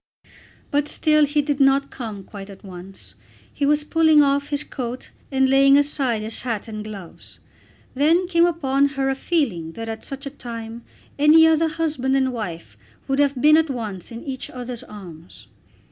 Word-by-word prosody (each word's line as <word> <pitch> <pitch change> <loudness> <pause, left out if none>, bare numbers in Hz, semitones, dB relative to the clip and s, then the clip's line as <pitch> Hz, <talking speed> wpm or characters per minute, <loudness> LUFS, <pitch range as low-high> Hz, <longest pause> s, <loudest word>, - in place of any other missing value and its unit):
But 290 0 +1
still 305 -1 +2
he 290 +1 +1
did 290 -1 -2
not 275 0 +3
come 220 -6 -7
quite 195 0 -10
at 195 - -13
once. 190 0 -11 0.4
He 285 - -1
was 295 +1 +2
pulling 315 -1 +4
off 280 0 0
his 290 0 -1
coat 250 -1 -6 0.2
and 265 0 +3
laying 275 +1 +5
aside 270 -6 0
his 220 +1 -1
hat 230 -4 -4
and 215 -1 -6
gloves. 200 -5 -10 0.6
Then 325 +7 +2
came 340 -1 +4
upon 280 -5 +1
her 270 0 +1
a - - -1
feeling 225 - -1
that 225 +3 -6
at 220 0 -6
such 275 0 -8
a 275 - -5
time 230 -3 -8 0.4
any 310 +2 +7
other 320 0 +3
husband 310 -5 -1
and 260 -1 +1
wife 170 - -6 0.3
would 270 +1 0
have 280 -2 +2
been 305 +3 +6
at 320 -1 +2
once 215 -8 -6
in 230 0 -8
each 265 -2 -6
other's 250 -1 -7
arms. 175 -5 -12
270 Hz, 175 wpm, -22 LUFS, 225-295 Hz, 0.6 s, any